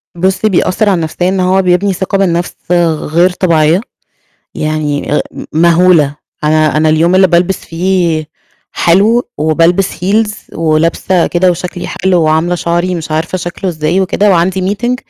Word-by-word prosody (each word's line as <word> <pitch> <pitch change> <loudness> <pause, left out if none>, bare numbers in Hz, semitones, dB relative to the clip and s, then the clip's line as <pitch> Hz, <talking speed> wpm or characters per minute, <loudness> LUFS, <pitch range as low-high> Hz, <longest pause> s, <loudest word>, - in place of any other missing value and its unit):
بُصّي، 190 +4 0
بيأثر 190 +3 +1
على 190 - +2
النفسية 170 +2 -2
إن 190 0 -1
هو 185 +1 +2
بيبني 185 +2 +1
ثقة 190 +2 -2
بالنفس 175 -2 -1 0.2
غ - - +4 0.3
غير 170 +4 +2
طبيعية، 170 -1 +1 0.7
يعني 150 -2 -2
آآ - - +1
م - - -8 0.2
مهولة. 170 -4 +3 0.3
أنا 155 -1 +2
أنا 155 0 +2
اليوم 165 +4 +2
اللي 190 0 +5
بالبس 175 +2 +1
فيه 170 -2 -1 0.5
حلو 210 +8 +2
وبالبس 165 +5 +1
heels 210 +3 +1 0.2
ولابسة 165 +3 +1
كده 180 +1 +1
وشكلي 180 +1 -5
حلو 180 -2 0
وعاملة 160 +3 +1
شعري 175 +1 -1
مش 160 -2 -6
عارفة 165 +4 -2
شكله 175 +2 -4
إزاي 160 +3 -1
وكده، 200 +2 +1
وعندي 185 +2 +1
meeting، 240 +3 -1
175 Hz, 150 wpm, -12 LUFS, 160-190 Hz, 0.7 s, اللي